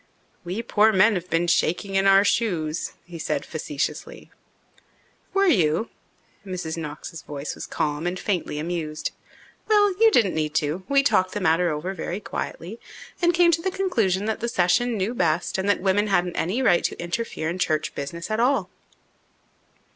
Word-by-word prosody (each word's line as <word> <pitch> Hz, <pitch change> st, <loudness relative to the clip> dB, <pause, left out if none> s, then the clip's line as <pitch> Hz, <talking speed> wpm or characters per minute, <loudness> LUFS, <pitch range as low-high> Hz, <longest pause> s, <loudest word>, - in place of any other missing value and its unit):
"We 185 Hz, +6 st, -4 dB
poor 220 Hz, -1 st, +4 dB
men 210 Hz, +3 st, +5 dB
have 180 Hz, -2 st, -4 dB
been 165 Hz, +1 st, +1 dB
shaking 175 Hz, +3 st, +1 dB
in 195 Hz, 0 st, +3 dB
our 195 Hz, +1 st, +6 dB
shoes," 170 Hz, -8 st, 0 dB
he 175 Hz, -2 st, -9 dB
said -, -, -2 dB
facetiously. 150 Hz, -2 st, -5 dB, 1.0 s
"Were 395 Hz, 0 st, +3 dB
you?" 180 Hz, -, +2 dB, 0.5 s
Mrs. 180 Hz, -5 st, -4 dB
Knox's 160 Hz, +1 st, -7 dB
voice 145 Hz, 0 st, -6 dB
was -, -, -8 dB
calm 150 Hz, +2 st, -2 dB
and 180 Hz, +1 st, -3 dB
faintly 180 Hz, -7 st, -2 dB
amused. 155 Hz, -1 st, -3 dB, 0.6 s
"Well, 415 Hz, -2 st, +4 dB
you 450 Hz, -, +8 dB
didn't 225 Hz, -, +3 dB
need 155 Hz, -1 st, -2 dB
to. 155 Hz, +4 st, 0 dB
We 275 Hz, 0 st, +4 dB
talked 185 Hz, -9 st, +2 dB
the 205 Hz, -, -2 dB
matter 175 Hz, -1 st, +2 dB
over 160 Hz, +5 st, -3 dB
very 180 Hz, +1 st, -4 dB
quietly 205 Hz, +1 st, -6 dB, 0.4 s
and 345 Hz, 0 st, +4 dB
came 345 Hz, 0 st, +4 dB
to 330 Hz, 0 st, +1 dB
the 380 Hz, -, 0 dB
conclusion 225 Hz, -, 0 dB
that 220 Hz, 0 st, -2 dB
the 235 Hz, -, -2 dB
session 215 Hz, +6 st, +2 dB
knew 200 Hz, +4 st, -1 dB
best 170 Hz, -3 st, 0 dB
and 195 Hz, +2 st, -1 dB
that 205 Hz, -, +2 dB
women 200 Hz, +2 st, +2 dB
hadn't 180 Hz, -3 st, +1 dB
any 205 Hz, +11 st, -1 dB
right 175 Hz, -8 st, +4 dB
to -, -, -2 dB
interfere 175 Hz, -1 st, -3 dB
in 175 Hz, +3 st, -3 dB
church 155 Hz, -3 st, 0 dB
business 170 Hz, +8 st, -6 dB
at 215 Hz, -, 0 dB
all." 265 Hz, +4 st, +1 dB
185 Hz, 170 wpm, -24 LUFS, 165-220 Hz, 1.0 s, you